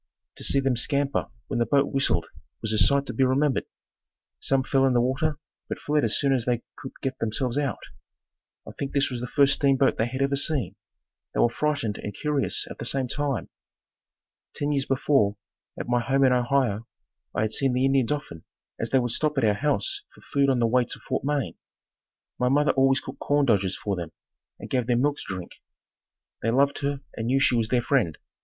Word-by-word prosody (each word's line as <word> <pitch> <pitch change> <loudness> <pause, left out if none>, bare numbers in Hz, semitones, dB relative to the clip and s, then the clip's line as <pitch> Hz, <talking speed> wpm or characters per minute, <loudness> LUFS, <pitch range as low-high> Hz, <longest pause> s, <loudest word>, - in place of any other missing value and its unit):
To - - -8
see 140 - +2
them 135 -2 +1
scamper 140 +3 0 0.2
when - - -2
the 120 - +3
boat 140 +4 +2
whistled 110 -11 +1 0.4
was 110 -1 0
a 110 - +2
sight 140 +3 +4
to 125 - -5
be 130 - +2
remembered. 130 +2 +2 0.7
Some 135 -1 +1
fell 135 0 +2
in 130 - +2
the 120 - +4
water, 140 +5 0 0.3
but - - -3
fled 150 0 +1
as 115 -1 +1
soon 140 -2 +2
as 125 -4 0
they 120 -2 0
could 130 - -9
get 135 -1 -2
themselves 115 +3 -1
out. 140 -3 -1 0.8
I - - -6
think 140 - -5
this 140 -1 +2
was 120 -2 -4
the 125 - -3
first 140 +2 +4
steamboat 135 -1 +2
they 110 - +2
had 130 +3 -2
ever 140 0 +1
seen. 135 - 0 0.6
They - - 0
were 120 - +4
frightened 145 -8 -1
and 105 - -6
curious 150 -2 0
at - - -9
the - - -5
same 130 +1 0
time. 140 -1 -2 1.1
Ten 145 0 -1
years 140 -2 0
before, 125 -6 +2 0.4
at - - -4
my 120 0 +2
home 135 +3 +1
in 130 -1 +5
Ohio, 120 -3 +1 0.5
I - - +1
had 110 0 0
seen 135 +2 +1
the 130 +1 +2
Indians 135 -2 +2
often 145 - -4 0.4
as 115 - -2
they 135 - +3
would 120 -2 0
stop 150 +4 -1
at 135 - +2
our 105 -2 +4
house 135 -2 -1
for - - -17
food 140 -1 +1
on 130 - +3
the 120 - +2
way 125 +2 +3
to - - -7
Fort - - -3
Wayne. 140 - -1 0.8
My 125 - +2
mother 145 +2 +3
always 135 0 +3
cooked - - -9
corn 145 0 +2
dodgers 100 -6 +2
for 100 -2 -2
them 85 -3 -5 0.5
and - - -8
gave 125 -3 -1
them 120 -1 +2
milk 145 0 +1
to - - -7
drink. 90 -1 -9 0.8
They 115 - 0
loved 140 +4 +2
her 140 -1 -2
and 115 - -3
knew 135 +2 +3
she 135 - +3
was 115 -2 +1
their 120 +1 +1
friend. 120 - +1
130 Hz, 215 wpm, -26 LUFS, 115-140 Hz, 1.1 s, in